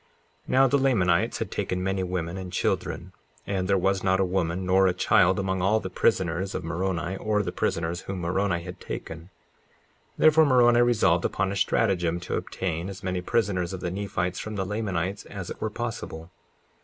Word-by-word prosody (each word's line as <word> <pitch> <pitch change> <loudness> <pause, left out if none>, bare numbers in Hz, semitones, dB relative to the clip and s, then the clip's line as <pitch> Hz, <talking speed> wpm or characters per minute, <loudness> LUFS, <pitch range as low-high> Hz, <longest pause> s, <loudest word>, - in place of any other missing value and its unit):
54:3 - - -36 0.4
Now 135 +1 +5
the 140 - +3
Lamanites 95 -11 +2
had - - -4
taken 90 0 -2
many 95 0 -1
women 90 -2 -3
and 95 -1 -6
children, - - -2 0.3
and 95 -2 -1
there 100 0 +3
was 95 +1 +1
not 95 0 +2
a 95 - +3
woman 90 0 -1
nor 95 +1 +4
a 90 - +1
child 90 +1 +4
among 95 -1 -1
all 105 +4 +3
the 95 - -6
prisoners 95 -2 0
of 90 - -3
Moroni, 85 +2 -2
or 105 0 0
the 90 - -3
prisoners 85 +1 -2
whom 95 -2 -5
Moroni 85 0 0
had 90 0 -8
taken; 80 +2 -7 0.9
therefore 155 0 +6
Moroni 120 -2 +5
resolved 105 -8 +3
upon 95 0 0
a - - -3
stratagem 90 -4 +1
to - - -5
obtain 85 0 -3
as 95 - -9
many 90 -1 -2
prisoners 95 -3 0
of 95 - -5
the 90 -1 -3
Nephites 90 -2 -2
from 110 0 -5
the 95 -1 -2
Lamanites 95 -2 -2
as 100 -4 -7
it - - -9
were 110 - -1
possible. 105 -7 -6
95 Hz, 190 wpm, -26 LUFS, 90-100 Hz, 0.9 s, therefore